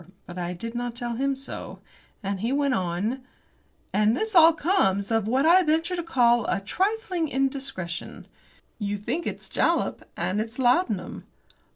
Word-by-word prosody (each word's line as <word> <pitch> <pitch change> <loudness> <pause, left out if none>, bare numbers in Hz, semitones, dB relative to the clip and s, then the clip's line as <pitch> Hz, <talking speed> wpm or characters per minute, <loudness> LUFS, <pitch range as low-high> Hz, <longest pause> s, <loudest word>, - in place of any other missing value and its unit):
But 175 +1 -8
I 175 0 -3
did 230 +6 -6
not 240 -1 -3
tell 240 -1 -4
him 275 +3 0
so. 270 +1 -8 0.5
And 195 0 -2
he 230 +5 -1
went 280 -1 +1
on: 190 +6 -1 0.7
"And 215 +3 +3
this 440 0 -2
all 335 -2 +8
comes 280 - +1
of 225 -2 +1
what 260 +5 +2
I 350 +3 +7
venture 325 +2 +1
to 345 - -2
call 240 -7 +3
a - - +1
trifling 370 - -1
indiscretion. 265 - -3 0.5
You 205 -1 -2
think 245 - -3
it's - - -5
jalap, - - 0 0.2
and 205 +3 0
it's 225 +1 -6
laudanum." 245 - +1
245 Hz, 160 wpm, -26 LUFS, 205-315 Hz, 0.7 s, all